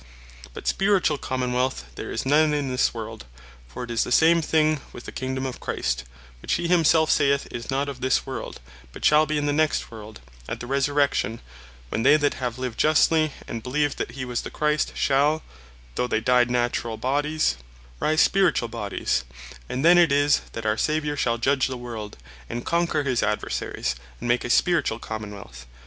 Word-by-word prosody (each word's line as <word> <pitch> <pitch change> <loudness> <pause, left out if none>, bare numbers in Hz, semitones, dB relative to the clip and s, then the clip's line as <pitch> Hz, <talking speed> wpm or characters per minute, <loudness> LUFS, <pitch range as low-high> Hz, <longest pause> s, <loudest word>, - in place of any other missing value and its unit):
But - - -8
Spirituall 195 -7 +2
Common 125 -1 -2
wealth 125 - -1
there - - -7
is - - -3
none 150 +2 +3
in 145 -2 -1
this 125 0 +1
world: - - -7 0.4
for 60 - -7
it 120 - -6
is 115 - +1
the - - -6
same 165 +5 +5
thing 155 -2 +2
with 120 - -11
the - - -7
Kingdome 130 0 -3
of 130 - -5
Christ; 65 0 -2 0.4
which - - -2
he 170 - 0
himselfe 165 -2 +4
saith, 140 0 +2
is 120 0 -6
not 135 +2 0
of 135 -3 -7
this 130 0 +1
world; - - -6 0.3
but - - -6
shall 150 +1 +5
be 155 +1 0
in 145 - -1
the 145 - +1
next 155 -3 0
world, 110 -1 -10 0.3
at - - -4
the - - -6
Resurrection, 140 -4 +1 0.5
when 110 - -2
they 145 +5 +6
that 145 -1 +1
have 125 -2 -4
lived 125 -3 -5
justly, 155 0 +3 0.2
and 115 - -5
beleeved 145 +3 0
that - - -3
he 130 -1 -5
was 125 -1 -2
the - - -7
Christ, 150 0 0
shall 145 +3 +2 0.5
(though 125 - -1
they 110 - 0
died 125 +1 +3
Naturall 120 -2 -1
bodies) 145 - 0 0.4
rise 155 +1 +2
Spirituall 190 -11 +2
bodies; 100 - -2 0.5
and 130 +4 -2
then 175 +1 +7
it 170 -4 +5
is, 145 +1 +3
that 115 - -6
our 110 0 +1
Saviour 150 +1 0
shall 120 -4 0
judge 130 +3 +2
the 130 -1 -5
world, 115 -4 -7 0.3
and 120 +1 -5
conquer 170 -3 +1
his 130 -4 0
Adversaries, 105 - -2 0.3
and - - -5
make 120 +1 +2
a - - -4
Spirituall 160 -6 +2
Common 110 -2 -6
wealth. 65 -10 -12
130 Hz, 195 wpm, -24 LUFS, 120-150 Hz, 0.5 s, then